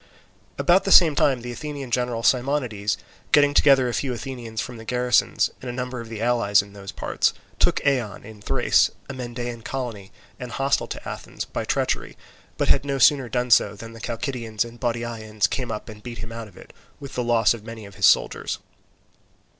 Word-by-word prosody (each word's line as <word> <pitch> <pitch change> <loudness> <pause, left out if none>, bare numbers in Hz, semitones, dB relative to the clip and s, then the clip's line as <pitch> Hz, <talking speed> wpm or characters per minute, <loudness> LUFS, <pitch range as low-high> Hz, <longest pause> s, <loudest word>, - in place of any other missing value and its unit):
About 180 +2 +4
the 195 - -1
same 165 -5 +8
time 135 -3 +2
the 120 - -5
Athenian 140 0 -6
general 120 -2 0
Simonides 125 -6 +1 0.3
getting 145 -1 +5
together 135 -3 +5
a 120 - -2
few 135 +1 -1
Athenians 120 -2 -6
from 125 0 -4
the 115 - -10
garrisons, 125 +1 +2
and 130 - -6
a - - -2
number 125 0 -4
of 115 - -10
the 110 -1 -5
allies 115 -5 +3
in 100 0 -15
those 100 -1 -8
parts, - - 0 0.2
took - - +3
Eion 125 -8 0
in 110 -2 -12
Thrace, - - +3 0.2
a 140 - -6
Mendaean 120 -2 -5
colony 115 -8 -5 0.3
and 125 -2 -7
hostile 135 +2 +1
to - - -7
Athens, - - -6
by - - -4
treachery, - - -1 0.4
but - - 0
had - - +4
no 140 -1 -2
sooner 135 -1 +4
done 125 0 -1
so 105 - +5
than 115 +2 -10
the 115 - -11
Chalcidians 115 -2 -2
and 120 0 -12
Bottiaeans 115 -3 -1
came 130 -3 -3
up 105 - -5
and 105 -2 -10
beat 120 0 -8
him 115 - -7
out 115 -1 -6
of 95 - -18
it, - - -14 0.3
with 140 - -9
the 125 - -1
loss 120 -2 +3
of 115 -3 -9
many 115 -1 -8
of 100 - -12
his 100 -1 +4
soldiers. - - +2
120 Hz, 200 wpm, -24 LUFS, 110-130 Hz, 0.4 s, same